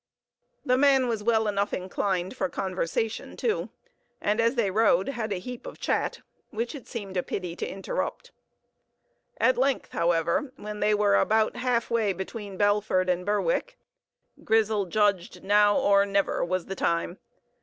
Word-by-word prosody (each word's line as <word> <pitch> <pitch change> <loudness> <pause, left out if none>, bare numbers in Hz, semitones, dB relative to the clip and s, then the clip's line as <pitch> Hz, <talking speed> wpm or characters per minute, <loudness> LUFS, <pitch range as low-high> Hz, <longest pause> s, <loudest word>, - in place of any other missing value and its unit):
The 255 -1 +3
man 270 -2 +4
was 225 -3 -1
well 220 0 +2
enough 200 0 0
inclined 185 0 -2
for - - -1
conversation, 190 +4 -3
too, 450 -3 -1 0.5
and 210 +3 +1
as 230 +3 +2
they 220 -6 +1
rode 200 -2 +3
had 230 -5 -3
a - - 0
heap 245 +6 -8
of - - -9
chat, - - -1 0.3
which 230 +5 -3
it 280 -5 -10
seemed 195 -5 -6
a - - +2
pity 175 -2 -5
to - - -3
interrupt. 195 0 -4 1.1
At 255 - +3
length, 270 +1 0
however, 170 - 0
when 210 0 -7
they 210 0 +3
were 205 -1 +3
about 220 0 +2
half 245 -2 0
way 220 -4 +2
between 195 +1 -7
Belford 205 -2 +2
and 180 0 -1
Berwick, - - -1 0.7
Grizel 215 -3 +2
judged 190 -2 0
now 205 +1 +4
or 200 0 +4
never 200 0 +1
was 180 0 -1
the 195 - -5
time. 170 0 -1
205 Hz, 155 wpm, -27 LUFS, 190-230 Hz, 1.1 s, man